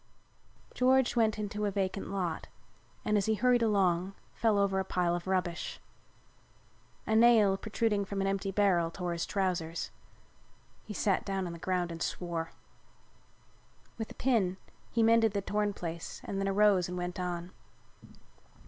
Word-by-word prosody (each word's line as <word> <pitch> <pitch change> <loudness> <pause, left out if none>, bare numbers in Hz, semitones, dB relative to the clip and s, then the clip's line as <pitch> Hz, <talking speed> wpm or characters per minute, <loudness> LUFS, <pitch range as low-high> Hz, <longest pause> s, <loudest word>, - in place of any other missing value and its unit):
George 260 0 +3
went 220 -3 +2
into 210 0 -3
a - - +1
vacant 195 0 -2
lot 180 -5 -3 0.6
and, 210 - +2
as 200 - -2
he 220 - +2
hurried 245 +2 +3
along, 195 -4 +2 0.2
fell 220 -3 +2
over 195 -1 +2
a - - 0
pile 180 -2 0
of 175 +1 -5
rubbish. 180 -2 -2 1.3
A 220 - +1
nail 220 -4 +6
protruding 210 0 0
from 195 0 -4
an 195 - 0
empty 195 0 -1
barrel 190 -4 +2
tore 175 0 -3
his 170 -1 -3
trousers. 175 -4 -2 0.9
He 210 - -8
sat 195 0 +1
down 195 -2 -2
on 170 - -5
the 170 - -9
ground 180 -1 -1
and 165 0 -7
swore. 165 -2 -3 1.5
With 220 - -3
a - - -11
pin 210 -8 +1 0.3
he 230 - +1
mended 225 -1 +4
the 200 - 0
torn 210 +1 0
place 170 -3 -6
and 195 - -4
then 195 - 0
arose 195 -2 +3
and 180 - -4
went 180 +1 -4
on. 175 0 -3
195 Hz, 155 wpm, -31 LUFS, 180-210 Hz, 1.5 s, nail